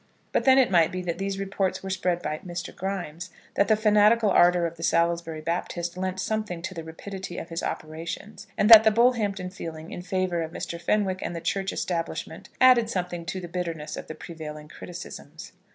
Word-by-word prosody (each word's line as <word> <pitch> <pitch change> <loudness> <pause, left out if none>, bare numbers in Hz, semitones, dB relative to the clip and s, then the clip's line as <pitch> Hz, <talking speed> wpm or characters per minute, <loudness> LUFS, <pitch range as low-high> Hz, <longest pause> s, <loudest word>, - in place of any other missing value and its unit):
But - - +1
then 265 0 +7
it 260 -6 +4
might 170 -3 +4
be 185 0 -4
that 170 0 -3
these 195 0 -2
reports 195 -1 -1
were 190 - -4
spread 180 -2 0
by 155 0 -2
Mr. 175 -1 -6
Grimes, 185 -2 -4 0.2
that 200 - +2
the 215 - +5
fanatical 210 0 +4
ardour 175 0 +5
of 170 0 -3
the 165 - -12
Salisbury 170 -1 +1
Baptist 170 +1 -3
lent 185 0 -3
something 205 -5 -2
to 190 +1 -4
the 165 -2 -6
rapidity 175 +3 -7
of - - -6
his 165 0 -3
operations, 165 +7 -6
and 210 - +3
that 220 -1 +11
the 220 - +6
Bullhampton 210 -5 +2
feeling 165 -4 -7
in - - -6
favour 185 -2 -1
of 160 0 -5
Mr. 170 -1 -5
Fenwick 190 0 +1
and 175 - -4
the - - -3
Church 195 +3 -1
Establishment 170 -2 -4
added 250 -3 +6
something 175 -4 -3
to 175 +3 -3
the 175 - -7
bitterness 165 -3 -4
of - - -7
the 155 - -7
prevailing 155 -2 -8
criticisms. 165 -3 -9
180 Hz, 200 wpm, -26 LUFS, 170-195 Hz, 0.2 s, that